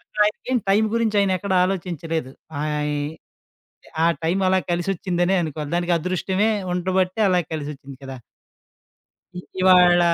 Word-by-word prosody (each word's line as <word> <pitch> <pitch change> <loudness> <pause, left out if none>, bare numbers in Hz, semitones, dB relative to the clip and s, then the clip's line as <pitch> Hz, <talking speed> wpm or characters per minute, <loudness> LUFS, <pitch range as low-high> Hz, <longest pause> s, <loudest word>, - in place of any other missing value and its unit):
అక్కడ - - -16
ఆయనకేం 250 +4 -1
టైం 210 +3 +4
గురించి 225 -2 +1
ఆయన 195 - +1
ఎక్కడా 190 0 -1
ఆలోచించలేదు. 165 -6 -3 0.3
ఆయి 150 -1 -1 1.0
ఆ - - +5 0.2
టైం 170 +4 +1
అలా 190 - +3
కలిసొచ్చిందనే 175 +1 0
అనుకోవాలి. 150 -2 -5
దానికి 175 0 0
అదృష్టమే 185 +4 0 0.2
ఉండబట్టే 185 +2 0
అలా 180 -1 +3
కలిసొచ్చింది 145 -3 -6
కదా! 135 0 -7 1.2
ఇ - - -3 0.2
ఇవాళ 180 -1 +6
180 Hz, 125 wpm, -22 LUFS, 160-190 Hz, 1.2 s, ఇవాళ